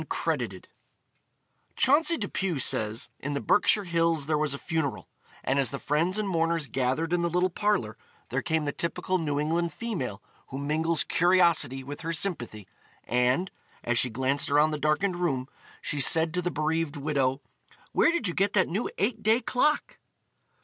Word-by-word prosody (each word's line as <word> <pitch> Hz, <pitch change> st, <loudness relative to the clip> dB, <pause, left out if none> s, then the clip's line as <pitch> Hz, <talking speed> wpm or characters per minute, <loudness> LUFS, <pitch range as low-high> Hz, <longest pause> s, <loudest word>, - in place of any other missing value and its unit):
CROWDED -, -, -2 dB, 1.1 s
Chauncey 300 Hz, +5 st, +4 dB
Depew 195 Hz, -, -2 dB
says: 110 Hz, -1 st, 0 dB
In 145 Hz, +1 st, -4 dB
the -, -, 0 dB
Berkshire 205 Hz, +4 st, +3 dB
Hills 165 Hz, -4 st, +1 dB
there 155 Hz, +1 st, 0 dB
was 150 Hz, -2 st, 0 dB
a -, -, -5 dB
funeral, 160 Hz, -2 st, -3 dB, 0.4 s
and 135 Hz, +2 st, +1 dB
as 135 Hz, -4 st, +2 dB
the 140 Hz, -, -4 dB
friends 165 Hz, +8 st, 0 dB
and 215 Hz, -1 st, -1 dB
mourners 165 Hz, -3 st, 0 dB
gathered 135 Hz, +6 st, -1 dB
in 175 Hz, -, +2 dB
the 170 Hz, -, 0 dB
little 180 Hz, +2 st, +1 dB
parlor, 195 Hz, -, 0 dB, 0.3 s
there 135 Hz, +2 st, -1 dB
came 160 Hz, -2 st, -1 dB
the 145 Hz, -, -1 dB
typical 180 Hz, +4 st, -2 dB
New 145 Hz, -3 st, -1 dB
England 165 Hz, +3 st, 0 dB
female 150 Hz, -, -4 dB, 0.3 s
who 135 Hz, -, -7 dB
mingles 155 Hz, +3 st, 0 dB
curiosity 170 Hz, -7 st, +3 dB
with 145 Hz, +2 st, -8 dB
her 165 Hz, +1 st, -3 dB
sympathy, 120 Hz, -, -2 dB, 0.4 s
and, 125 Hz, -, +1 dB, 0.3 s
as 120 Hz, 0 st, +1 dB
she 125 Hz, -, +3 dB
glanced 130 Hz, +4 st, 0 dB
around 150 Hz, +2 st, +4 dB
the 150 Hz, -, -3 dB
darkened 160 Hz, +5 st, +1 dB
room, 135 Hz, -8 st, -1 dB, 0.4 s
she 145 Hz, -, -2 dB
said 160 Hz, +4 st, +4 dB
to 180 Hz, -, 0 dB
the 180 Hz, -, -1 dB
bereaved 160 Hz, -1 st, -1 dB
widow: 135 Hz, -2 st, 0 dB, 0.5 s
"Where -, -, +4 dB
did 340 Hz, -11 st, 0 dB
you 170 Hz, -, -2 dB
get 200 Hz, +3 st, +1 dB
that 190 Hz, -3 st, +2 dB
new 200 Hz, +8 st, -2 dB
eight 220 Hz, +2 st, -1 dB
day 220 Hz, +3 st, +3 dB
clock?" 295 Hz, +4 st, 0 dB
160 Hz, 170 wpm, -27 LUFS, 140-180 Hz, 1.1 s, Chauncey